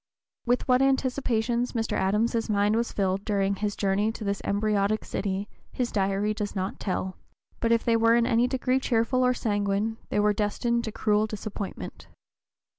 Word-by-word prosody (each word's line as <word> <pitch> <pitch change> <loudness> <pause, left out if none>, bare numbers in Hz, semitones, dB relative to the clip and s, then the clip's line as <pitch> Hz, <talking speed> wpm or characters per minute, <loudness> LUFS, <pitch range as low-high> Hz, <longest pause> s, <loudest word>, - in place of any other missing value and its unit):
With 245 +3 +1
what 250 0 +4
anticipations 250 -3 +1
Mr. 225 -2 -2
Adams's 225 +4 +1
mind 205 +1 +2
was 235 +1 0
filled 195 -1 0
during 200 -2 0
his 205 0 -2
journey 200 +2 +1
to 225 - -7
this 200 -1 -2
embryotic 210 0 +1
(p. - - -14
031) - - -14 0.4
city - - -34 0.2
his 245 -2 -2
Diary 200 +1 0
does 210 -1 -4
not 190 0 -3
tell; 185 -1 -3 0.4
but 230 - +1
if 230 -1 +2
they 230 - +3
were 230 0 +4
in 235 -1 +3
any 235 0 +3
degree 255 0 +1
cheerful 255 0 +1
or 250 0 +3
sanguine 205 0 -1
they - - 0
were 210 0 +3
destined 235 +3 0
to 220 - -4
cruel 210 0 +1
disappointment. 210 -1 -6
215 Hz, 180 wpm, -27 LUFS, 205-235 Hz, 0.4 s, what